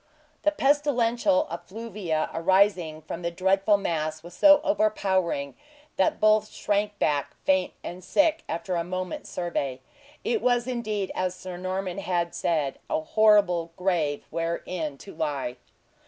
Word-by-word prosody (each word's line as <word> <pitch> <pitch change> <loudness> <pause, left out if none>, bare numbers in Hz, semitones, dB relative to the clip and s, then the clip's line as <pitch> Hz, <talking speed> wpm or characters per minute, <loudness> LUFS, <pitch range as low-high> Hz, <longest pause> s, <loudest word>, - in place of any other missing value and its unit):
The 305 - +4
pestilential 285 -1 +2
effluvia 185 -2 -3
arising 175 -3 +2
from 165 +2 -6
the 170 - -1
dreadful 195 +4 +2
mass 155 -4 -2
was 175 +1 -11
so 295 +5 +7
overpowering 190 - +1 0.4
that 190 - +2
both 215 0 +4
shrank 205 0 -1
back, 145 -5 0
faint 190 -1 +2
and 180 +1 -7
sick, 305 - +2
after 180 +3 -2
a 170 - 0
moment's 185 0 -5
survey. 140 -7 -3 0.4
It 450 -4 0
was 245 -1 +2
indeed 215 -6 -2
as 185 0 -1
Sir 185 -1 -8
Norman 185 +1 -3
had, 175 -3 -1
said, 150 -5 -1
a - - +1
horrible 180 -3 +3
grave 170 -6 0
wherein 165 -2 -3
to 195 - -11
lie. 140 -5 -3
185 Hz, 135 wpm, -26 LUFS, 165-215 Hz, 0.4 s, so